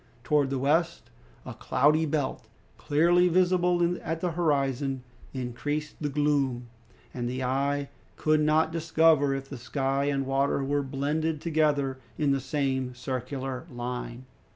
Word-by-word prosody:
Towards 145 +1 +2
the 135 - -1
west, 165 +6 0 0.3
a - - -6
cloudy 150 +4 +2
belt, 145 -3 -2 0.3
clearly 175 +4 +3
visible 175 -1 +2
at 165 +1 -3
the 175 0 -1
horizon, 140 -5 0 0.3
increased 145 +4 -4
the 150 - -1
gloom, 140 -4 0 0.5
and 120 -1 -3
the 130 +1 -3
eye 140 +2 0 0.3
could 155 0 +2
not 155 +1 +3
discover 160 -3 +3
if 135 0 -5
the 135 -2 -8
sky 135 +2 -1
and 140 -1 0
water 135 +1 +1
were 145 +1 0
blended 150 +4 -1
together 150 -5 +1 0.2
in 145 -2 +2
the 135 -1 +1
same 130 -2 -1
circular 130 +3 -4
line. 125 0 -5
140 Hz, 135 wpm, -27 LUFS, 135-155 Hz, 0.5 s, clearly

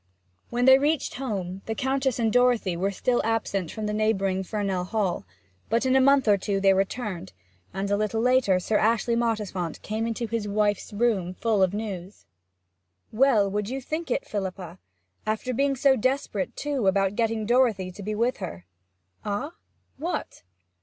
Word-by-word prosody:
When 245 +1 0
they 265 0 +8
reached 295 +1 0
home, 195 -8 -4
the 220 - -2
Countess 265 -1 0
and 225 -3 +1
Dorothy 245 -7 +3
were 190 +3 0
still 240 +5 0
absent 210 -6 -1
from 215 - -5
the 210 - -2
neighbouring 195 -3 +1
Fernell 195 -2 -2
Hall, 195 - -1 0.4
but 230 +3 +1
in 260 0 +3
a 265 - +6
month 275 -1 +4
or 205 -1 +5
two 195 +1 -1
they 195 0 +5
returned, 195 - -2 0.4
and 195 +2 -3
a - - +4
little 215 +2 -1
later 245 -6 +3
Sir 210 +4 0
Ashley 230 +1 +2
Mottisfont 210 -7 -2
came 220 +2 -2
into 230 +1 -2
his 225 -2 -3
wife's 205 0 0
room 205 -5 0
full 220 -2 +1
of 190 +1 +2
news. 200 -3 -6 0.9
'Well 225 -4 +4
would 210 +1 -2
you 265 +2 -3
think 315 +5 -4
it, - - -1
Philippa! 190 -4 -5 0.5
After 220 +4 -1
being 275 +3 +1
so 270 +1 +4
desperate, 255 -5 -1
too, 280 -8 -1
about 195 0 +2
getting 225 -1 0
Dorothy 225 -6 +2
to 190 - -11
be 210 +2 -3
with 235 +4 +1
her!' 85 +1 -7 0.6
'Ah 210 +9 -3 0.5
what?' 335 +6 -4
215 Hz, 170 wpm, -26 LUFS, 195-245 Hz, 0.9 s, they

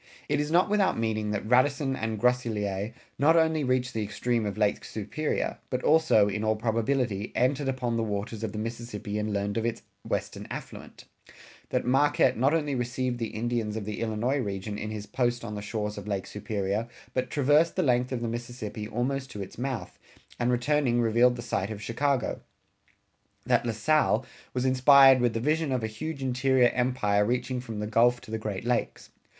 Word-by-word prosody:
It 145 0 +1
is 150 0 -1
not 175 +5 +4
without 205 -2 +2
meaning 110 -2 -1
that 105 0 -3
Radisson 135 +3 +3
and 110 -3 -3
Groseilliers 110 -4 0 0.3
not 155 +4 +5
only 160 -2 +3
reached 130 0 0
the 110 - -2
extreme 115 +1 -1
of 100 - -4
Lake 105 -1 +1
Superior 110 +9 -3
but 125 -1 -2
also, 155 -10 +5
in 105 +1 -2
all 110 0 +2
probability, 115 -1 -1
entered 135 +3 +1
upon 125 -3 -1
the - - +1
waters 105 +1 -3
of 110 - -2
the 105 - -7
Mississippi 110 -2 -4
and 105 0 -2
learned 100 +1 -1
of 115 - 0
its 115 0 -4 0.2
western - - -3
affluent; - - -8 0.7
that - - -1
Marquette 135 0 +3
not 130 +5 +2
only 150 -3 0
received 125 0 -2
the 115 - -1
Indians 110 -1 -2
of 110 -2 -4
the 105 0 -4
Illinois 115 +5 0
region 100 -2 -3
in 105 +1 -4
his 105 -1 -5
post 120 -1 -1
on 105 - -5
the 105 - -5
shores 105 0 -3
of 100 - -10
Lake 100 -2 -2
Superior, 105 +1 -2 0.3
but 130 0 -1
traversed 150 +4 +3
the 185 - +1
length 125 -2 +2
of 125 -2 -2
the - - -1
Mississippi 115 -2 -5
almost 130 +4 -2
to 105 - -7
its 95 - -11
mouth, 130 -2 -4 0.4
and 120 0 +2
returning 125 0 +2
revealed 120 +2 +4
the 120 - -6
site 100 -4 -2
of 110 -2 -5
Chicago; 125 +4 -1 1.0
that - - +2
La - - +1
Salle 120 +1 +2 0.3
was 125 0 0
inspired 130 0 +7
with 120 -2 +1
the - - 0
vision 155 +3 0
of 125 -3 0
a - - +1
huge 140 +6 -5
interior 130 -1 +3
empire 120 -5 +1
reaching 125 +3 -1
from 115 -3 -7
the 105 - -2
Gulf 120 +3 +3
to - - -12
the 110 - -2
Great 105 -1 -4
Lakes. 120 -1 -2
120 Hz, 190 wpm, -28 LUFS, 110-130 Hz, 1.0 s, inspired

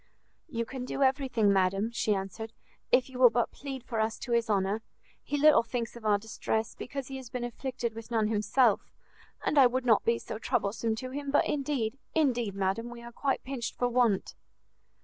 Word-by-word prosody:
"You 230 -5 -2
can 260 +1 -6
do 275 +2 -1
everything, 260 -6 +2
madam," 195 +3 +1
she 215 -2 +1
answered, 195 +4 -5 0.4
"if 250 0 +4
you 260 -1 -9
will 250 -1 +9
but 240 0 0
plead 270 -3 -7
for 230 -3 -3
us 220 0 0
to 245 - -5
his 235 -1 +2
honour: 200 +1 +1 0.4
he 290 - -2
little 300 +1 +6
thinks 230 0 -4
of 235 -2 -11
our 205 -1 +5
distress, 220 +1 -2
because 275 0 -6
he 270 - -5
has 260 -3 -9
been 250 0 -4
afflicted 240 -1 -3
with 225 0 -9
none 225 -3 +1
himself, 215 +2 +3 0.6
and 295 - +3
I 260 - +9
would 250 +1 -2
not 225 -4 +4
be 230 0 +2
so 220 - -7
troublesome 220 +1 0
to 255 +3 -6
him, 285 +1 -4
but 285 - +3
indeed, 270 -4 -1 0.2
indeed, 245 -10 +1
madam, 195 +5 -1
we 240 0 -10
are 235 - -9
quite 270 +3 -1
pinched 255 -2 -4
for 245 - +1
want!" 235 -5 +2
235 Hz, 200 wpm, -29 LUFS, 220-260 Hz, 0.6 s, will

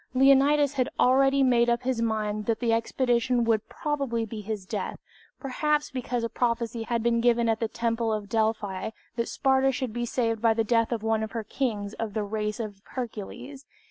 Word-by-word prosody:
Leonidas 275 +2 +5
had 255 -3 0
already 270 +2 +4
made 240 -2 +4
up 240 +1 +1
his 250 -2 -1
mind 215 -2 -1
that 225 -1 +1
the 235 -2 +1
expedition 240 +1 +1
would 225 -2 +1
probably 275 -6 -2
be 220 0 -7
his 210 -2 -5
death, - - -4 0.4
perhaps 295 +2 0
because 245 -2 -2
a - - +1
prophecy 235 -1 -1
had 230 0 -1
been 235 0 +2
given 235 -1 +3
at 225 -1 +1
the 225 - 0
Temple 230 0 -1
at 210 -1 -5
Delphi 215 -2 -1 0.3
that 235 -1 -1
Sparta 265 0 +2
should 255 -3 -3
be 240 0 -2
saved 230 -3 -1
by 225 -1 +4
the 225 - +2
death 230 +1 +2
of 230 -2 -2
one 225 -1 +1
of 220 - -4
her 230 -2 -3
kings 210 -3 -2
of 220 -2 -5
the 215 - 0
race 210 +1 -3
of 205 -3 -6
Hercules. 250 +3 -6
230 Hz, 195 wpm, -27 LUFS, 220-255 Hz, 0.4 s, Leonidas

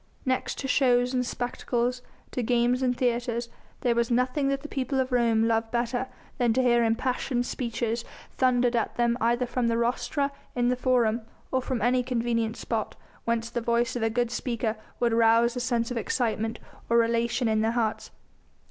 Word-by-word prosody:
Next 260 -1 -1
to 270 - -3
shows 250 -1 +3
and 250 -1 +1
spectacles, 245 0 -2 0.3
to 250 - -2
games 245 +2 +2
and 250 -1 +1
theatres, 240 -1 -1 0.3
there 245 -2 +2
was 235 0 +1
nothing 255 +4 +1
that 275 0 0
the - - -5
people 265 -1 -2
of 260 0 0
Rome 230 -2 +3
loved 225 0 +1
better 240 +2 -1 0.3
than 240 -2 +3
to 260 - +2
hear 240 -1 +4
impassioned 245 +2 0
speeches 235 -2 -2 0.3
thundered 245 -1 +2
at 230 - -1
them 240 0 +2
either 240 +2 +2
from 245 0 -1
the 230 0 +1
rostra 260 +4 0 0.2
in 245 0 +2
the 250 - +2
Forum, 245 -3 +2 0.3
or 260 - +1
from 255 -2 -2
any 250 +1 +3
convenient 235 -2 -1
spot 225 -3 -3 0.3
whence 230 0 -1
the 240 - -2
voice 235 +1 +1
of 245 - -2
a 225 - +2
good 240 +1 0
speaker 235 -2 -2 0.2
would 235 -2 +2
rouse 230 +1 +4
a - - -2
sense 240 -1 0
of 245 - -2
excitement 225 -1 -1 0.3
or 235 0 +5
elation 235 +1 0
in 215 -1 +2
their 225 +1 +1
hearts. 225 -3 -1
240 Hz, 185 wpm, -27 LUFS, 230-250 Hz, 0.3 s, or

